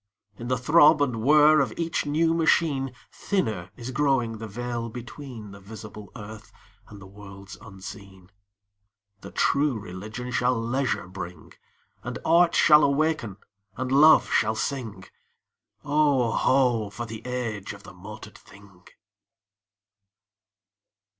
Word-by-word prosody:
In 120 - -6
the 130 0 0
throb 150 +4 +5
and 125 -6 0
whir 150 +4 +6
of 135 - 0
each 165 -3 -2
new 160 +3 +2
machine 155 -5 +1 0.2
Thinner 110 - -2
is 120 +2 -6
growing 125 -5 0
the 110 - -6
veil 120 +2 -4
between 120 -2 -9
The 100 - -12
visible 105 0 -11
earth 110 0 -10 0.4
and 105 - -12
the 95 - -12
worlds 100 0 -12
unseen. 95 -2 -12 0.9
The - - -10
True 140 -3 +1
Religion 105 +6 -7
shall 125 0 +1
leisure 120 -4 -2
bring; 90 -3 -9 0.5
And 125 +1 -6
Art 170 +1 +4
shall 150 -1 +6
awaken 140 -7 0 0.4
and 130 +1 -3
Love 155 +4 +6
shall 110 +1 +2
sing: 110 -5 -4 0.8
Oh, 145 -5 +2
ho! 120 -6 +2
for 120 +4 -6
the 110 0 -9
age 115 -5 -4
of - - -14
the - - -12
motored - - -11
thing! 100 -2 -18
120 Hz, 125 wpm, -25 LUFS, 105-140 Hz, 0.9 s, whir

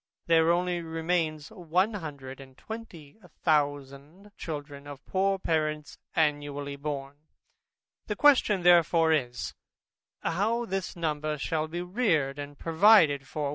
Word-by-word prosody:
There 165 -1 +4
only 175 0 0
remain 165 -1 -1
a 190 +2 0
hundred 140 -5 -8
and 130 -1 -14
twenty 215 -9 -10 0.3
thousand 145 +4 -1
children 145 -2 -7
of 145 -2 -10
poor 195 +1 +1
parents 155 -4 -2 0.2
annually 145 -2 -1
born. 140 -1 -5 0.9
The 210 - -2
question 220 -9 +4
therefore 170 -2 +5
is, 125 -5 -2 0.7
How 215 +8 0
this 195 -2 -4
number 155 -2 -2
shall 155 +2 -2
be 175 +2 -5
reared 170 - 0
and 145 0 -8
provided 160 -5 +4
for? 150 -2 -3
160 Hz, 120 wpm, -28 LUFS, 145-180 Hz, 0.9 s, therefore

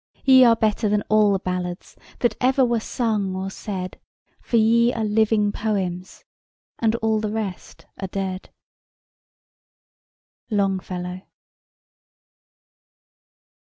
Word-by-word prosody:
"Ye 260 -1 +8
are 230 -1 +6
better 215 -1 0
than 205 0 +1
all 215 -1 +4
the 195 - +2
ballads 180 -1 -5 0.3
That 240 - +2
ever 260 +1 +3
were 235 -1 +1
sung 215 -5 -2
or 190 +1 -4
said; 185 -3 -6 0.4
For 235 - 0
ye 230 +2 +4
are 225 - -2
living 215 -1 +2
poems, 190 -4 -3 0.6
And 225 -1 +2
all 220 -1 +2
the 215 0 -2
rest 210 -4 -6
are 190 - -3
dead." 190 0 -4 2.0
LONGFELLOW. 185 -3 -2
210 Hz, 110 wpm, -23 LUFS, 190-225 Hz, 2.0 s, Ye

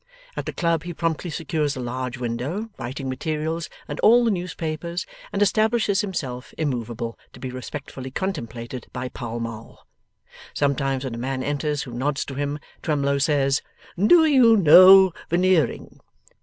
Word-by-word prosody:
At - - -5
the - - -2
club 170 -3 0
he 175 -1 -7
promptly 165 +1 -2
secures 150 -1 -2
a - - -6
large 125 +1 -4
window, 130 - -3
writing 130 +3 -5
materials, 155 +5 -3 0.2
and - - -6
all 240 +2 +6
the 230 - +3
newspapers, 170 -1 -4 0.3
and 205 - +2
establishes 215 0 +2
himself; 135 -11 -5
immoveable, 120 -5 -3
to - - -13
be 130 - -5
respectfully 130 +1 -7
contemplated 130 - -5
by 125 0 -4
Pall 120 -2 -6
Mall. 115 -1 -8 0.7
Sometimes, 135 -1 0
when 130 -3 -4
a 115 - -5
man 130 +1 -3
enters 145 0 -1
who 125 - -9
nods 140 +4 -1
to 140 - -7
him, 145 +1 -2 0.2
Twemlow 140 -3 0
says, 140 -2 +2 0.3
'Do 320 - +5
you 255 -7 +6
know 185 +2 +8 0.2
Veneering? 175 -4 +1
145 Hz, 150 wpm, -23 LUFS, 130-175 Hz, 0.7 s, know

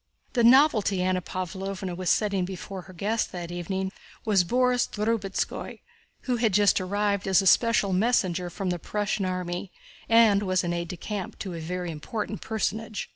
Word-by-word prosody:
The 240 - +2
novelty 230 -7 +5
Anna 185 0 +1
Pávlovna 190 +1 -5
was 180 -1 -2
setting 200 -3 +2
before 190 +1 -6
her - - -8
guests 210 +6 -1
that 175 -1 -6
evening 190 +2 -3 0.3
was 200 -4 +4
Borís 250 +5 +2
Drubetskóy, 210 -2 -2 0.4
who 250 -2 -1
had 225 -3 +1
just 205 -2 +4
arrived 200 +1 -1
as 190 -1 +5
a - - -4
special 210 -1 +4
messenger 185 -4 +1
from 185 +1 -3
the 175 - -3
Prussian 205 +1 -2
army 180 0 -3 0.4
and 225 -3 +6
was 185 -3 +1
aide 170 0 -2
de 180 - -6
camp 200 +1 -5
to 190 - -5
a 165 - -5
very 175 +2 -4
important 210 +7 -5
personage. 220 0 -3
195 Hz, 165 wpm, -26 LUFS, 180-215 Hz, 0.4 s, and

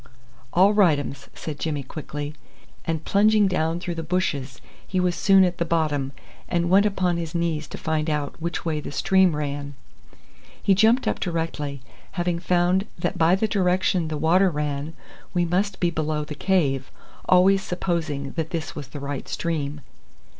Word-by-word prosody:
"All 190 +4 +5
right 185 -8 +5
ums," 140 -1 -6
said 150 -3 -6
Jimmy 150 -3 -2
quickly, 145 +1 -6 0.5
and 160 -1 -2
plunging 210 0 +4
down 165 -2 0
through 175 -1 -4
the 165 - -4
bushes 155 -7 -2 0.3
he 185 - -1
was 180 -1 +2
soon 195 +1 +5
at 180 -1 0
the - - +2
bottom, 155 -5 0 0.4
and 170 0 0
went 200 +2 +6
upon 185 -4 0
his 165 -1 -5
knees 165 -3 -1
to - - -8
find 155 0 -1
out 150 -2 -2
which 170 +1 -3
way 155 -2 0
the 150 - -6
stream 190 +1 +3
ran. 145 -1 -4 0.8
He 195 - +3
jumped 220 +6 +4
up - - 0
directly, 160 -5 -3 0.3
having 175 -1 -1
found 180 +2 +2
that 175 +2 -2
by 165 +2 +5
the 220 +3 0
direction 185 -3 +1
the 155 -1 -3
water 175 +5 +4
ran 150 0 -3 0.4
we 175 -1 +3
must 190 +3 0
be 175 -1 +2
below 155 -1 -1
the 150 - -6
cave, 145 -6 +1 0.4
always 190 +2 +5
supposing 165 -7 -2
that 160 -1 -3
this 165 -2 -4
was 145 -3 -6
the 145 - -8
right 140 -1 -5
stream. 150 -3 -3
165 Hz, 170 wpm, -24 LUFS, 150-185 Hz, 0.8 s, went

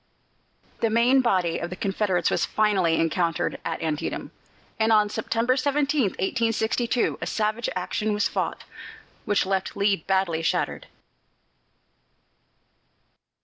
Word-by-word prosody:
The 230 - +1
main 240 +4 +4
body 185 -9 +1
of 170 - -4
the 180 - -6
Confederates 190 -2 0
was - - +1
finally 195 -6 +2
encountered 165 0 0
at 165 0 -4
Antietam, 155 -2 -3 0.5
and 220 +1 +3
on 210 -1 +4
September 230 +4 0
17, 285 +1 +1
1862, 230 +3 0
a - - -3
savage 215 +2 -1
action 210 +4 -2
was 210 0 +1
fought, - - -3 0.6
which 205 -1 +1
left 190 0 -2
Lee 200 0 +2
badly 185 -1 0
shattered. 165 - -1
210 Hz, 115 wpm, -25 LUFS, 180-230 Hz, 0.6 s, main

